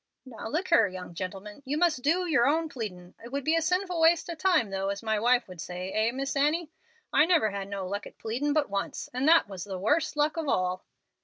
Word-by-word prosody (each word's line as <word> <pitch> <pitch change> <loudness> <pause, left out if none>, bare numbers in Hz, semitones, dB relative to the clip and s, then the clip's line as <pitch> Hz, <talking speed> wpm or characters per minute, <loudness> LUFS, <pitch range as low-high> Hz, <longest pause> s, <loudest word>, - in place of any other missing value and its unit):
"Now 235 -4 -8
look 335 +9 -2
here, 225 -11 +5
young 185 -2 -8
gentleman, 195 +6 -7
you 285 +2 -2
must 330 -6 +2
do 335 +7 +2
yer 285 -8 +3
own 320 +2 +1
pleadin'. 185 -9 -7
It 235 - -10
would 280 0 -2
be 315 - +2
a 330 - +2
'sinful 360 +1 0
waste 325 0 +4
of 335 -2 -5
time' 320 - +2
though, 195 0 -2
as 200 +1 -4
my 220 -1 0
wife 245 +2 +3
would 180 -3 -9
say 180 +3 -5
eh, 220 +3 +1
Miss 270 +3 -3
Annie? 305 +3 +1 0.4
I 300 - +6
never 320 - +3
had 200 -1 -5
no 200 -1 -4
luck 200 +2 -4
at - - -16
pleadin' 250 +7 -2
but 295 -1 +2
once, 200 0 -4
and 255 +3 0
that 330 -6 +6
was 190 -3 -7
the 195 -2 -5
worst 300 - 0
luck 300 +2 +1
of 320 -2 -2
all." 185 -6 0
250 Hz, 240 wpm, -28 LUFS, 200-315 Hz, 0.4 s, I